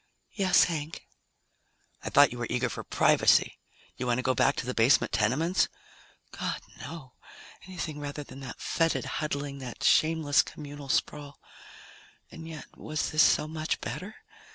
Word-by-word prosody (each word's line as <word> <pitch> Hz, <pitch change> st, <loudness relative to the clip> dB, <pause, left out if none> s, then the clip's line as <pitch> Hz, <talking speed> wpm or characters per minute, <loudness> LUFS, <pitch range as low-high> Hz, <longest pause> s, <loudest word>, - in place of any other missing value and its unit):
"Yes, 195 Hz, -4 st, +4 dB
Hank." 160 Hz, -2 st, -4 dB, 1.0 s
"I -, -, -4 dB
thought 145 Hz, 0 st, +6 dB
you 120 Hz, -, -7 dB
were 120 Hz, -, -2 dB
eager 125 Hz, 0 st, 0 dB
for -, -, -6 dB
privacy. -, -, +3 dB, 0.4 s
You 125 Hz, -, -3 dB
want 120 Hz, -1 st, +2 dB
to 130 Hz, -, -2 dB
go 130 Hz, -, +2 dB
back 140 Hz, -, +2 dB
to -, -, -4 dB
the 125 Hz, -, -3 dB
basement 115 Hz, +4 st, +3 dB
tenements?" 155 Hz, -, +1 dB, 0.7 s
_God, -, -, -3 dB, 0.2 s
no! 135 Hz, -2 st, -9 dB, 0.5 s
Anything 160 Hz, -5 st, -5 dB
rather 145 Hz, 0 st, -5 dB
than 135 Hz, -1 st, -12 dB
that 130 Hz, -3 st, -8 dB
fetid 165 Hz, -1 st, 0 dB
huddling, 140 Hz, -2 st, -3 dB
that 125 Hz, -3 st, -8 dB
shameless 155 Hz, -2 st, +4 dB
communal 145 Hz, -2 st, -9 dB
sprawl. 145 Hz, +1 st, -2 dB, 0.9 s
And 160 Hz, 0 st, -9 dB
yet, 160 Hz, -2 st, -8 dB
was 155 Hz, -1 st, -3 dB
this 155 Hz, -, +4 dB
so 150 Hz, -, +4 dB
much 155 Hz, 0 st, -3 dB
better? 200 Hz, +4 st, -6 dB
145 Hz, 155 wpm, -28 LUFS, 130-160 Hz, 1.0 s, thought